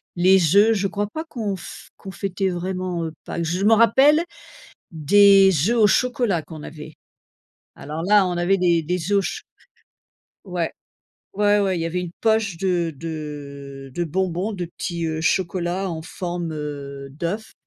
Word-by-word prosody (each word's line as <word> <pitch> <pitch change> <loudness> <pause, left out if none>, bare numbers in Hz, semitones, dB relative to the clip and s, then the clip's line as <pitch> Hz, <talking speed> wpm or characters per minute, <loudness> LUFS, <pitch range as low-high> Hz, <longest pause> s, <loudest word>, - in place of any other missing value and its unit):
les 180 -1 +4
œufs. 220 +2 +6
Je 200 -2 0
crois 205 +2 -2
pas 315 +9 -5
qu'on 220 -10 -4
f 180 - -11
qu'on 195 - -10
fêtait 190 +1 -2
vraiment, 180 -1 -3
heu, 160 - -5
Pâques. 170 - -4
Je 180 +4 -1
m'en 220 +2 +6
rappelle 270 +8 +5 0.7
des 195 +5 +6 0.2
œufs 240 - +2
au 215 - +6
chocolat 235 -7 +1
qu'on 155 -2 -10
avait. 155 0 -10 0.8
Alors 155 +3 -6
là, 200 0 +4
on 175 -1 -2
avait 185 +3 +2
des 170 -2 +2
des 180 +4 -2
œufs 200 - +5
au - - +1
cho - - -4 1.0
Ouais, 180 -3 -3 0.6
ouais, 205 0 +3
ouais, 190 -3 0
il - - -3
y 165 - -1
avait 180 +2 -2
une 175 -1 -6
poche 220 -5 +1
de 175 -4 0
de 140 -3 -7
de 175 - -1
bonbons, 185 +4 -2
de 180 -3 -4
petits, 170 -1 -4
heu, 160 0 -3
chocolats 180 +2 -1
en 160 -1 -5
forme, 175 -2 -5
heu, 140 -2 -6
d'œuf 175 +9 -4
180 Hz, 170 wpm, -22 LUFS, 165-200 Hz, 1.0 s, œufs